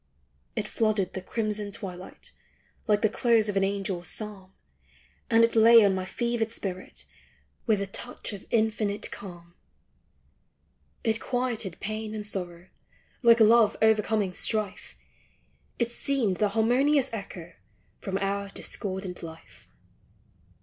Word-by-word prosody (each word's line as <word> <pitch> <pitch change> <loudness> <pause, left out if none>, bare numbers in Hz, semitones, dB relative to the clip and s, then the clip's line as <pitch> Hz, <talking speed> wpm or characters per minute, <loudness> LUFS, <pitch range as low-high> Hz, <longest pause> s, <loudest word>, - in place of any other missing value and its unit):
It - - -2
flooded 215 -4 0
the 190 - -4
crimson 210 +1 -3
twilight, 190 -4 -8 0.6
Like 210 0 +2
the - - +6
close 225 0 +2
of 205 - -2
an 195 - +3
angel's 195 -3 -2
psalm, 200 -1 -6 0.8
And 230 -1 +5
it 230 - +2
lay 230 0 +8
on 195 - +3
my 185 0 -2
fevered 235 +2 -1
spirit, 185 -4 -5 0.6
With 215 -3 +3
a - - 0
touch 220 +3 -3
of 200 - -9
infinite 220 -2 0
calm. 175 -3 -10 1.5
It 225 -1 +2
quieted 240 -8 -2
pain 215 +1 -4
and 210 -1 -4
sorrow, 180 -3 -4 0.5
Like 235 -2 +6
love 225 0 +5
overcoming 215 -3 +2
strife; 205 - -2 0.8
It 235 0 0
seemed 235 -7 +1
the 210 - +2
harmonious 255 +6 +3
echo 180 -5 -7 0.5
From 195 -1 -3
our 200 0 -2
discordant 190 -2 -5
life. 165 -1 -12
210 Hz, 125 wpm, -27 LUFS, 190-225 Hz, 1.5 s, lay